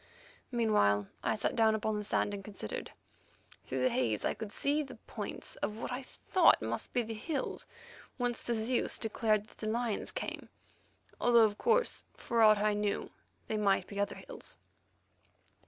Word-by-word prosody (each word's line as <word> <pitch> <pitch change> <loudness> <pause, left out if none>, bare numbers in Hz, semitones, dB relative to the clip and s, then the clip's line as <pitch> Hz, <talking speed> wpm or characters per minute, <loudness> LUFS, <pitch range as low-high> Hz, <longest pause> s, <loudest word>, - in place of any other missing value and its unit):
Meanwhile 155 - +3
I 220 - +1
sat 215 - -1
down 220 -1 +4
upon 220 0 -1
the 210 - -2
sand 205 0 +1
and 200 -1 -5
considered. 195 - -5 0.7
Through 130 -1 -2
the 130 - +4
haze 115 -5 0
I - - +2
could 220 -2 -7
see 290 +6 +1
the 275 - -7
points - - -7
of 210 - -3
what 235 - -4
I 250 +2 -3
thought 345 +6 +3
must - - -3
be 245 - +1
the 225 0 -5
hills 270 +6 -3 0.5
whence 245 -2 0
the 240 - -1
Zeus 230 +3 +1
declared 215 -1 +1
that 220 - -21
the 215 - -2
lions 230 -1 -1
came, - - -5 0.7
although 235 -2 +6
of 205 -1 -2
course, 475 +1 +2
for 235 -1 0
aught 215 -1 +8
I 210 +1 +2
knew, 205 -1 -1 0.4
they 220 - -1
might 200 -2 +2
be 200 - -6
other 200 - 0
hills. - - -10
220 Hz, 170 wpm, -32 LUFS, 205-240 Hz, 0.7 s, aught